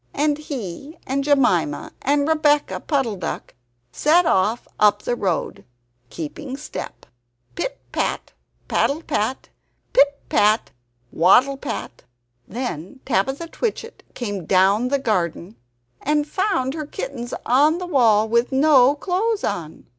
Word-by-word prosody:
And 295 0 +1
he 275 - -7
and 275 +1 -1
Jemima 245 - +1
and 285 +1 +1
Rebeccah 300 -2 +1
Puddle 265 -9 0
duck - - -5 0.4
set 335 - +3
off 220 -3 +1
up 205 -1 +4
the 240 - -1
road, 190 -7 -2 0.5
keeping 255 - -6
step 300 - -8 0.5
pit - - -4
pat, - - -2 0.3
paddle 310 +4 0
pat! 255 -3 -2 0.4
pit 280 +1 +4
pat, 215 -7 +2 0.4
waddle 245 +11 +4
pat! 195 - -6 0.4
Then 230 - -5
Tabitha 270 - 0
Twitchit 460 +3 -4
came 205 -8 -4
down 195 +5 +3
the 280 +2 +1
garden 190 - -2 0.5
and 295 +1 0
found 300 -7 0
her 305 -2 -5
kittens 255 -4 -5
on 290 +7 +4
the 360 - -5
wall 225 -10 +3
with 235 +2 +1
no 270 -1 +5
clothes 395 +7 -1
on. 160 -3 -4
265 Hz, 125 wpm, -22 LUFS, 210-295 Hz, 0.5 s, no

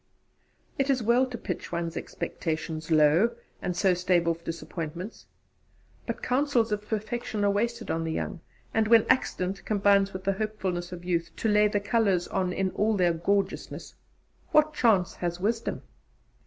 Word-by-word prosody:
It 275 +1 +1
is 260 -4 +2
well 240 +4 +3
to 250 -2 -6
pitch - - -5
one's 170 -1 -3
expectations 160 -1 -4
low, 160 +9 +4 0.3
and 180 -1 -3
so 190 0 +4
stave 175 -1 +1
off 170 0 -1
disappointments. 170 +3 -6 0.8
But - - -4
counsels 250 -4 +1
of 210 0 -2
perfection 215 -1 -2
are 200 - +4
wasted 235 +4 -1
on 165 0 -1
the 160 - -2
young, 175 - -3 0.3
and 220 -1 +2
when 230 -1 +6
accident 185 -6 -1
combines 200 -1 +3
with 185 0 -7
the 195 - +1
hopefulness 190 -4 -3
of 175 -1 -8
youth 170 -2 0
to - - -2
lay 210 0 +5
the 205 0 0
colours 200 -4 +1
on 185 -1 0
in 190 +1 -1
all 215 +2 +1
their 175 -2 +3
gorgeousness, 195 +4 -2 0.6
what 305 0 +4
chance 210 -10 +3
has 175 0 -3
Wisdom? 225 +4 -1
195 Hz, 160 wpm, -27 LUFS, 175-220 Hz, 0.8 s, when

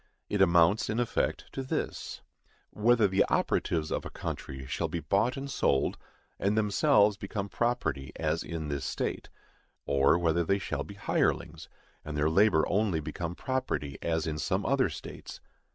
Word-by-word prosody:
It 105 - 0
amounts, 85 +3 +4
in 110 +2 0
effect, 120 - 0
to 135 - -4
this,—_Whether 120 -3 -1
the 95 +1 +3
operatives 80 -2 0
of - - -1
a - - -6
country 65 0 -6
shall - - -2
be 85 - -3
bought 100 - +1
and 135 +1 -4
sold, 70 - +1 0.4
and 100 +2 +1
themselves 105 -1 +4
become 100 0 -4
property, 100 - -1
as 80 +1 -1
in 80 -2 -5
this 70 -1 -3
state; - - -3 0.6
or 70 +3 +4
whether 85 0 +2
they 100 +4 +2
shall 95 -1 -3
be 100 - -10
hirelings, - - -1 0.3
and 75 0 -5
their 75 +1 +2
labor 95 -2 +4
only 100 -5 +1
become 85 +3 -5
property, 130 - -3
as 80 -1 0
in 75 -2 -3
some - - -1
other - - +2
states_. - - -9
95 Hz, 155 wpm, -29 LUFS, 80-105 Hz, 0.6 s, amounts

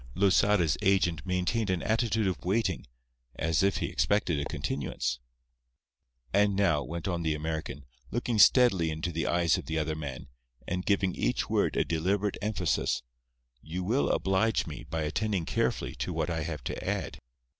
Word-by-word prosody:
Losada's 100 -2 +3
agent 95 -4 +2
maintained 90 +4 0
an 90 -2 0
attitude 110 -1 +1
of 95 -3 -2
waiting, 95 - 0 0.5
as 80 -1 +1
if 100 0 +2
he - - -1
expected 95 -7 +1
a 70 - -2
continuance. 65 -4 -3 1.1
"And 100 0 +3
now," 90 -7 +2
went 85 +5 -5
on 85 -2 -1
the 80 -2 0
American, 80 -2 -4 0.2
looking 120 -1 -1
steadily 100 -6 +6
into 80 +2 -3
the 80 0 -2
eyes 85 -1 +2
of - - -9
the 80 - -2
other 80 0 -1
man, 70 -3 -6 0.4
and 90 +1 -2
giving 95 -2 +2
each - - -1
word - - +1
a - - +2
deliberate 95 +5 0
emphasis, 100 - 0 0.6
"you 90 +4 -5
will 120 +9 +1
oblige 95 +4 +1
me - - -7
by 80 -1 -2
attending 95 +3 -1
carefully - - -1
to - - -3
what - - -1
I 80 -1 -1
have 75 -4 -5
to - - -4
add. - - -3
90 Hz, 165 wpm, -29 LUFS, 80-100 Hz, 1.1 s, steadily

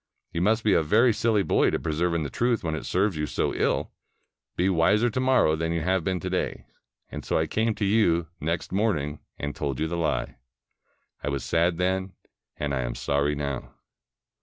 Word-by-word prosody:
You 85 - -2
must 110 +4 +2
be 105 - +3
a - - +4
very 110 +10 +4
silly 110 -2 +2
boy 80 - +3
to - - 0
persevere 85 +2 -1
in 80 - 0
the 70 - -5
truth 120 -3 0
when 80 -2 -1
it 80 - -4
serves 95 0 +1
you 75 0 -1
so - - -1
ill. - - 0 0.6
Be 90 - +1
wiser 105 +6 +3
to 130 - -2
morrow 130 -11 +3
than 80 +1 -2
you 85 - -1
have 95 +1 +1
been 90 +2 -1
to 90 - -3
day.' 95 - -2 0.5
And - - -6
so - - 0
I - - +2
came 110 0 0
to 105 - -1
you 95 -5 +3
next 80 +2 -2
morning 80 -8 0 0.2
and 70 0 -4
told 70 -3 -3
you 80 - 0
the 85 +1 -3
lie. 85 -2 -1 0.9
I 75 - -1
was 70 -2 -2
sad 85 +1 +1
then, 95 +1 -1 0.4
and 70 -1 -2
I 65 - 0
am - - -3
sorry 70 +1 0
now." 70 -3 -4
85 Hz, 210 wpm, -26 LUFS, 75-105 Hz, 0.9 s, a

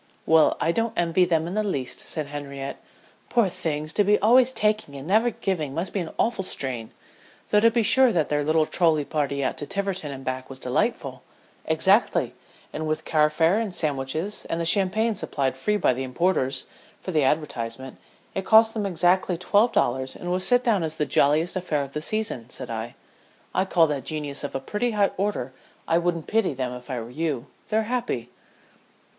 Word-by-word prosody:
"Well 160 -1 +4
I 165 - +2
don't 230 +4 -1
envy 175 +1 +3
them 165 -2 +1
in 175 - -5
the 215 +1 0
least," 140 -11 -3
said 155 -2 -4
Henriette. 140 -1 -6 0.5
"Poor 230 -5 +3
things 155 -2 -3
to 205 - +3
be 205 +1 +4
always 245 +4 +5
taking 210 - 0
and 135 +2 -8
never 220 +5 +3
giving 160 - -3
must 170 +4 -3
be 200 - 0
an 170 -3 -4
awful 225 -4 0
strain, 130 -10 -4 0.6
though 210 - +4
to 230 +2 +6
be 230 0 +1
sure 260 +3 +5
their 150 -5 +1
little 155 +1 +2
trolley 155 -3 +2
party 140 -2 -1
out - - -2
to 145 - -4
Tiverton 195 -6 -2
and 135 -1 -8
back 130 0 -4
was 135 - -7
delightful 125 -1 -2 0.2
" - - -33
"Exactly; - - +2 0.4
and 155 0 -3
with 155 0 -2
car 150 -1 +3
fare 165 +6 +2
and 210 -5 -3
sandwiches, 155 +6 -2
and 165 - -3
the 170 - -1
champagne 205 +5 +2
supplied 140 -9 -2
free 210 +11 0
by 165 - +2
the 130 - -4
importers, 130 -1 0 0.3
for 185 - -6
the 155 -3 +2
advertisement, 130 -3 -2 0.4
it 195 - -2
cost 220 +2 +6
them 210 -3 -2
exactly 180 0 +2
twelve 205 +6 +3
dollars 130 +2 0
and 175 - -5
was 185 +1 0
set 245 0 +4
down 220 -6 +2
as 160 -1 -3
the 150 - 0
jolliest 155 +6 +2
affair 165 -6 -1
of 140 0 -9
the 150 - -3
season," 170 - -3
said 125 -1 -7
I. 115 +1 -5 0.6
"I 190 - +1
call 170 -3 +4
that 145 -4 -3
genius 150 -2 -4
of 145 - -5
a - - 0
pretty 210 - -2
high 200 -1 +3
order. 190 -10 -2 0.3
I 165 - +3
wouldn't 170 -2 -1
pity 215 -10 +1
them 125 -1 -3
if 125 +1 -10
I 130 -2 -2
were 115 +1 -8
you. 145 -4 -2 0.2
They're 220 +1 +2
happy." 230 - -2
160 Hz, 195 wpm, -25 LUFS, 140-200 Hz, 0.6 s, to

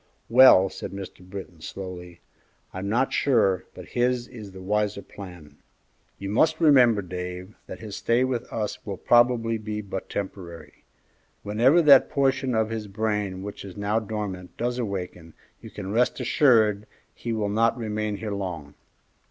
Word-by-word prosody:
"Well," 120 -6 +8
said 95 - -7
Mr. 100 -1 -8
Britton, 95 -3 -9
slowly, 90 -1 -8 0.5
"I'm 95 +2 -4
not 125 +5 +1
sure 100 -9 +2
but 90 -1 -11
his 125 0 0
is 110 -6 -10
the 95 - -11
wiser 105 +1 -1
plan. 85 -7 -12 0.6
You 100 - -6
must 155 +9 +2
remember, 125 - +5
Dave, 90 +2 -6
that - - -9
his 105 -3 -7
stay 120 +2 +2
with 130 -2 -3
us 105 -2 -4
will 100 -3 -5
probably 120 -2 +3
be 105 0 -4
but 95 -2 -6
temporary. 95 -4 -7 0.6
Whenever 125 +11 +4
that 140 -3 +7
portion 135 -2 +1
of 110 0 +1
his 110 -2 -4
brain 105 -2 -2
which 100 0 -7
is 95 -1 -10
now 100 +2 0
dormant 105 -4 -6
does 120 +1 -2
awaken, 90 -6 -5 0.3
you - - -10
can 100 -1 -7
rest 120 +5 +1
assured 115 -5 +3 0.3
he 120 - -5
will 110 -2 -1
not 115 +4 +2
remain 110 -2 -3
here 110 -1 -5
long. 85 -7 -5
105 Hz, 155 wpm, -25 LUFS, 95-120 Hz, 0.6 s, Well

